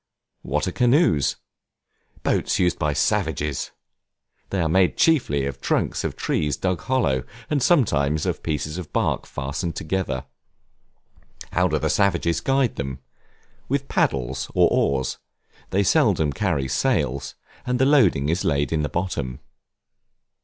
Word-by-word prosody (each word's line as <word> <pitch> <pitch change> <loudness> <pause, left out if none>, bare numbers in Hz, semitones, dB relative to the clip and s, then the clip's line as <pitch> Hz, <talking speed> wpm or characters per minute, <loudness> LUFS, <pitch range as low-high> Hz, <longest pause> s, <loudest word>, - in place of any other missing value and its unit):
What 75 +5 -1
are - - -1
Canoes? 120 - +3 0.9
Boats - - +1
used 90 -2 +1
by 75 - +1
savages; 75 0 0 0.8
they 95 - -2
are 85 - +2
made 90 +3 +2
chiefly 95 - +2
of 70 - -4
the - - -36
trunks - - 0
of - - -3
trees 75 -4 -1
dug 95 -4 -1
hollow; 110 - +1 0.3
and 145 -2 +1
sometimes 80 - +2
of - - -2
pieces 75 +1 -3
of 85 - -8
bark - - 0
fastened 70 +5 -4
together. 80 -7 -2 1.3
How - - +2
do - - 0
the - - 0
savages 85 -4 +1
guide 135 -2 +1
them? 70 -2 -4 0.7
With 140 +1 -1
paddles, 65 0 0
or - - +5
oars; 65 -2 0 0.5
they 100 +1 +2
seldom 80 -5 +3
carry 65 0 0
sails, 70 - 0 0.3
and 125 0 -1
the 130 - +3
loading 110 - +4
is 85 +4 0
laid 70 +2 0
in 80 - +1
the 75 - -2
bottom. 70 -9 -3
80 Hz, 140 wpm, -23 LUFS, 70-100 Hz, 1.3 s, or